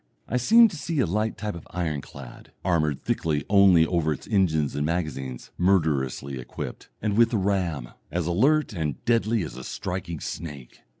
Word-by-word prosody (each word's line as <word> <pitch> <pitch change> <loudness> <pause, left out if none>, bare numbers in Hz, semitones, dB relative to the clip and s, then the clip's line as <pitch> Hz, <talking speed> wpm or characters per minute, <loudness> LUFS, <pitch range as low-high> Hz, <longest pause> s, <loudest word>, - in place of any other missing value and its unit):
I 125 - 0
seem 225 - +7
to 175 - -8
see 160 0 -3
a 130 - +4
light 105 +5 -1
type 105 -1 -3
of 85 - -10
ironclad, 75 -6 -6
armoured 75 -6 +1
thickly 75 -3 -1
only 95 -5 +6
over 80 -2 0
its 75 - -4
engines 80 - +1
and 75 - -1
magazines, 75 -6 -3
murderously 70 -7 +1
equipped, 60 - -7
and 105 -2 0
with 115 +1 +5
a - - +3
ram 90 -10 -1 0.2
as 90 -1 -1
alert 130 - +2
and 80 -6 -3
deadly 115 -3 +2
as 75 -6 -7
a 65 - -7
striking 85 +2 -4
snake. 75 -7 -7
85 Hz, 170 wpm, -25 LUFS, 75-105 Hz, 0.2 s, seem